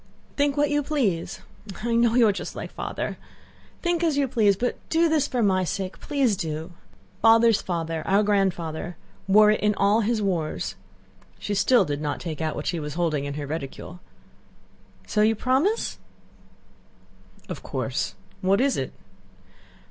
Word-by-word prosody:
"Think 285 0 +1
what 290 0 +2
you 290 0 +2
please! 255 - -1 0.4
I 235 0 0
know 235 0 +3
you 240 -3 +6
are - - +4
just 195 - -6
like - - -6
Father. - - -4 0.6
Think 345 -1 +1
as 315 -4 +2
you 280 -1 +2
please, 210 -5 +3
but 245 +6 -2
do 330 +1 +3
this 310 -3 +2
for 245 -4 0
my 190 -2 +3
sake! 185 +1 -4
Please 270 -7 +1
do! 160 0 -4 0.5
Father's 225 -1 +5
father, 165 -2 -3
our 200 +2 +4
grandfather, 180 -5 -1 0.3
wore 210 +2 +6
it 215 - +1
in 210 0 +1
all 205 +3 +3
his 225 +1 0
wars." 180 -7 -2 0.6
(She 205 - -4
still 240 +5 +4
did 145 0 -3
not 150 -1 -2
take 165 -3 -5
out 155 -1 -1
what - - -5
she 170 - -1
was 150 -1 -5
holding 160 -5 0
in 140 0 -4
her 145 -1 -4
reticule.) 155 +3 -6 1.1
"So 210 - 0
you 220 +1 +4
promise?" 270 - 0 1.5
"Of - - -6
course. - - -3 0.3
What 195 +2 +3
is 270 +1 +2
it?" - - -3
205 Hz, 165 wpm, -25 LUFS, 170-250 Hz, 1.5 s, you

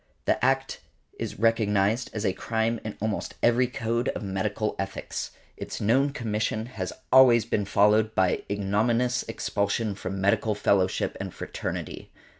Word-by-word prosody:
The - - +1
act - - +1 0.4
is - - -4
recognized 110 0 +2
as 110 0 -3
a 95 - +2
crime 115 +2 -1
in 110 - -6
almost 110 -1 -3
every 120 +2 +4
code 120 +1 -1
of - - -4
medical 100 +2 -2
ethics: 95 - -4 0.3
its - - -6
known 130 +7 +3
commission 110 -3 -2
has 95 -7 -5 0.2
always 125 -4 +7
been 105 -3 -1
followed 105 +2 +3
by 95 -1 +2
ignominious 115 +5 +1
expulsion 105 -1 -1
from 95 0 -5
medical 105 +2 +2
fellowship 95 -2 +1
and - - -4
fraternity. - - -6
110 Hz, 140 wpm, -26 LUFS, 100-115 Hz, 0.4 s, always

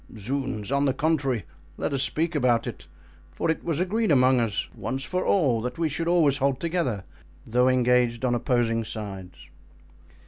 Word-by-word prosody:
"Zounds! 115 -1 -3
on 140 +1 +2
the 135 - +1
contrary, 135 - 0 0.3
let - - -2
us 135 - 0
speak 160 +4 -1
about 125 -6 +2
it; - - -7 0.4
for 160 - 0
it 160 - -4
was 165 -3 -1
agreed 215 +4 0
among 130 -3 +5
us, 115 -4 -1
once 135 +1 -4
for 180 +4 -2
all, 135 - +2
that 125 +1 -4
we 165 -1 0
should 165 +3 -3
always 160 -6 +3
hold 135 -1 +1
together, 165 - -1 0.4
though 125 +3 +2
engaged 125 -1 +2
on 125 - +2
opposing 120 -1 +1
sides." 100 -5 -8
130 Hz, 170 wpm, -26 LUFS, 120-155 Hz, 0.4 s, among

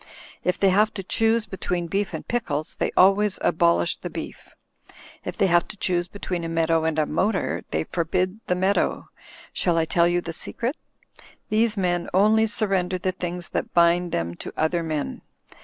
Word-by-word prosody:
If 180 +1 +1
they 195 - +4
have 210 +3 +3
to 195 - -4
choose 225 +3 +2
be 190 -1 -8
tween 175 -1 -2
beef 200 +4 -1
and - - -6
pickles, 155 -11 -2
they - - -1
always 195 +2 +4
abolish 85 - +2
the - - -6
beef. - - -8 0.7
If - - -6
they - - +3
have 175 -2 +3
to - - -10
choose 175 -2 0
between 180 -2 -4
a 165 - -3
meadow 165 0 +1
and 160 -1 0
a 155 - +3
motor, 165 - 0
they 80 0 -1
forbid 185 - -1
the 180 - +1
meadow. 190 +2 0 0.4
Shall 175 -2 +1
I 165 - +2
tell 170 +1 +3
you 175 0 +2
the 170 -1 -6
secret? 240 - -3 0.7
These 220 0 +2
men 175 -2 0
only 215 +3 +4
surrender 195 -4 0
the 185 +1 -1
things 180 -1 -5
that - - -3
bind 170 0 +4
them 85 0 -2
to - - -6
other 165 +2 +1
men. 155 -3 -3
180 Hz, 185 wpm, -24 LUFS, 165-200 Hz, 0.7 s, they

